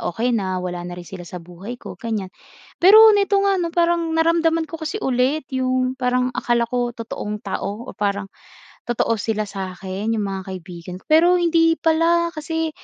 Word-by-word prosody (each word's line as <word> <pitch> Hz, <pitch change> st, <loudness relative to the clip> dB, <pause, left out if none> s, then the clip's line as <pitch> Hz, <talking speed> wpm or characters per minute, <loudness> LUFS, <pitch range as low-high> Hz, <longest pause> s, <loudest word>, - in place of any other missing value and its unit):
okey 240 Hz, +6 st, 0 dB
na 190 Hz, -3 st, -1 dB
wala 180 Hz, -1 st, -4 dB
na 175 Hz, 0 st, -7 dB
rin 175 Hz, -, -10 dB
sila 185 Hz, -2 st, -8 dB
sa 180 Hz, +1 st, -8 dB
buhay 180 Hz, +8 st, -9 dB
ko," -, -, -8 dB
ganiyan. 220 Hz, -5 st, -3 dB, 0.5 s
Pero 435 Hz, +5 st, +9 dB
nito 400 Hz, 0 st, +2 dB
nga, 395 Hz, -1 st, +2 dB
'no, 340 Hz, -, -1 dB
parang 340 Hz, -1 st, +1 dB
naramdaman 330 Hz, 0 st, +2 dB
ko 325 Hz, -, -6 dB
kasi 315 Hz, +7 st, -3 dB
ulit 265 Hz, +2 st, 0 dB
yung 255 Hz, 0 st, 0 dB
parang 250 Hz, -1 st, +1 dB
akala 235 Hz, -1 st, +1 dB
ko 245 Hz, 0 st, -1 dB
totoong 210 Hz, -2 st, -5 dB
tao 205 Hz, +4 st, -4 dB
o -, -, -4 dB
parang 200 Hz, -1 st, -1 dB, 0.6 s
totoo 240 Hz, -1 st, +1 dB
sila 215 Hz, +1 st, -1 dB
sa 190 Hz, -1 st, -5 dB
akin, 195 Hz, +4 st, -3 dB
yung 215 Hz, -, -1 dB
mga 195 Hz, -1 st, -4 dB
kaibigan, 180 Hz, 0 st, -8 dB
pero 335 Hz, +3 st, +6 dB
hindi 330 Hz, -1 st, +3 dB
pala 335 Hz, +1 st, +2 dB
kasi 320 Hz, +1 st, -2 dB
245 Hz, 180 wpm, -21 LUFS, 195-325 Hz, 0.6 s, Pero